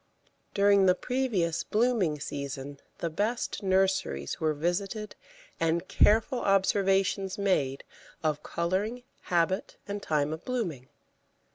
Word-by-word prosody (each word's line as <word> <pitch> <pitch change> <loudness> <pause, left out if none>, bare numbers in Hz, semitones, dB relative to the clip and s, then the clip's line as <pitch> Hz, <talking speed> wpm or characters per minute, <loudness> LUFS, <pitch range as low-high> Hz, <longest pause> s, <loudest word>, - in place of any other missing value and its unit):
During 200 -1 +5
the 180 - +5
previous 215 -10 -1
blooming 210 -9 +1
season 140 0 -5 0.2
the 170 - -2
best 215 +10 -1
nurseries 190 - 0
were 155 -1 +1
visited 195 +7 -2 0.4
and 165 +2 0
careful 225 +4 +3
observations 195 -1 +2
made 150 -10 0 0.4
of 150 -2 0
colouring, 195 +11 -2 0.2
habit, 175 +3 0
and 205 0 -4
time 150 -3 0
of 160 - -7
blooming. 180 - -3
190 Hz, 110 wpm, -29 LUFS, 160-205 Hz, 0.4 s, During